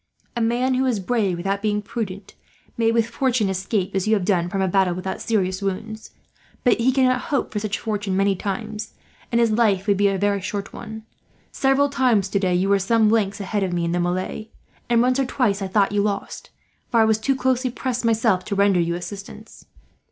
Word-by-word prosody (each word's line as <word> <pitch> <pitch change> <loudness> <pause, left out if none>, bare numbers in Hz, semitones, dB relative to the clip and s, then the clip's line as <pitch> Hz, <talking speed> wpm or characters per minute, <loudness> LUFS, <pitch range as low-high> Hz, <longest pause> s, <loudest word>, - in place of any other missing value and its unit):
A 235 - -1
man 240 +3 +1
who 260 +1 +1
is 235 -5 0
brave 195 -3 0
without 195 +3 -2
being 210 -1 0
prudent 200 -2 -6 0.4
may, 225 -1 +2
with 230 -1 +2
fortune, 235 -3 0
escape 190 +1 -2
as 190 +1 -1
you 220 - +4
have 195 -4 -1
done 180 -3 +1
from 195 - -2
a 190 - +1
battle 185 -1 +2
without 185 +1 -4
serious 190 -4 0
wounds; 215 +3 -4 0.5
but 245 -2 +3
he 245 +3 +3
cannot 255 -1 +2
hope 280 -3 0
for 210 - -1
such 210 -1 -2
fortune 205 -3 -2
many 195 0 +2
times, 215 +3 -5 0.4
and 235 - +2
his 230 -2 +3
life 210 -4 +2
would 200 -2 +2
be 200 0 +3
a 195 -1 0
very 200 0 0
short 200 +1 -5
one. 220 -1 -8 0.5
Several 270 +1 +2
times 245 -8 +1
today 190 -3 +1
you 185 +2 +1
were 200 0 +3
some 215 +2 +3
lengths 205 -2 +1
ahead 205 +1 -2
of 185 -2 -1
me 170 -1 0
in 170 - -1
the 175 - 0
melee; 185 +5 -2 0.4
and 235 0 +4
once 255 +2 +2
or 270 - +2
twice 215 -6 0
I 195 - -2
thought 200 +1 +2
you 205 0 +1
lost, 200 -1 -3 0.4
for 235 - +2
I 220 - +6
was 220 0 +2
too 270 +5 +1
closely 260 0 0
pressed, 250 0 -3
myself, 225 -5 +2
to 200 - -3
render 200 -2 +3
you 170 0 0
assistance. 200 +4 -9
210 Hz, 215 wpm, -22 LUFS, 195-230 Hz, 0.5 s, I